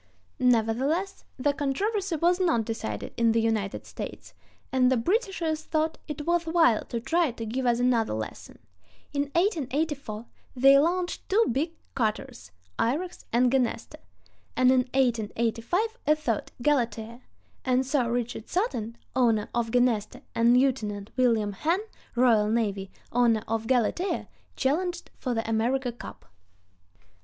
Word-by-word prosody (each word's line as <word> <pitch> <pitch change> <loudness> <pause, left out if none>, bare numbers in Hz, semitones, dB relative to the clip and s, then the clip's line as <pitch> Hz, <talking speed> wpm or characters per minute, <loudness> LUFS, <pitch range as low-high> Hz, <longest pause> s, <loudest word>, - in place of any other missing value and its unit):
Nevertheless, 255 - +1
the 285 +2 +1
controversy 370 +7 -1
was 345 +4 +2
not 325 - +2
decided 110 - -4
in 230 -1 +3
the 230 - +3
United 220 -3 -1
States, - - -8 0.4
and 255 -1 +3
the 260 - +3
Britishers 345 - 0
thought 315 0 -1
it 295 -1 -5
worth 340 -1 +1
while 325 -9 +4
to 235 - -3
try 325 +6 +1
to 230 -1 -6
give 250 +3 -2
us 240 0 +2
another 240 - +2
lesson. 110 0 -7 0.6
In 285 0 +1
1884 295 - -1 0.3
they 275 +2 +7
launched 350 +4 -1
two 445 +4 +4
big 305 +7 -1 0.2
cutters, 215 - -2 0.3
Irex 335 +10 -1
and 245 +1 +3
Genesta, 255 -3 -1 0.6
and 255 0 +5
in 260 - +5 0.2
1885 240 - 0
a 305 - +5
third, 245 -8 -2
Galatea; 235 -4 0 0.4
and 255 0 +2
Sir 255 -3 +1
Richard 240 -2 -3
Sutton, 235 - -2 0.2
owner 230 -5 +2
of 235 -1 0
Genesta, 235 -3 +1
and 235 +2 +4
Lieutenant 215 -6 0
William 225 -5 +2
Henn, 330 - 0 0.4
R. 230 -4 +4
N., 205 -4 0 0.2
owner 235 -3 +3
of 225 0 -2
Galatea, 260 - 0 0.3
challenged 345 +6 -1
for 250 -3 -2
the 225 0 -2
America 240 +3 0
Cup. 235 - -11
250 Hz, 135 wpm, -27 LUFS, 225-310 Hz, 0.6 s, they